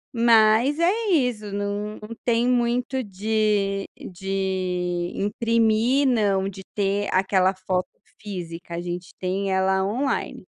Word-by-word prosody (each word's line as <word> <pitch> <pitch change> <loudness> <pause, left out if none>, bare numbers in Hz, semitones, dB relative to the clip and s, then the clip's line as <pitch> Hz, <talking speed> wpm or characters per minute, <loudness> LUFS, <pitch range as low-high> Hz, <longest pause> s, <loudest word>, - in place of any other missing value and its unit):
mas, 230 +4 +4
é 420 +7 +2
isso, 245 - +1
não 205 +1 -3 0.3
tem 235 0 +2
muito 250 +1 +1
de 205 -1 0
de 185 -2 -2
imprimir, 230 +5 +2
não, 200 -6 +2
de 195 -1 -7
ter 200 0 0
aquela 190 0 +2
foto 185 -1 -2 0.3
física, 170 -4 -7
a 170 - -3
gente 175 0 -6
tem 190 +1 -1
ela 190 0 +2
online. 250 +8 -2
205 Hz, 115 wpm, -24 LUFS, 190-230 Hz, 0.3 s, mas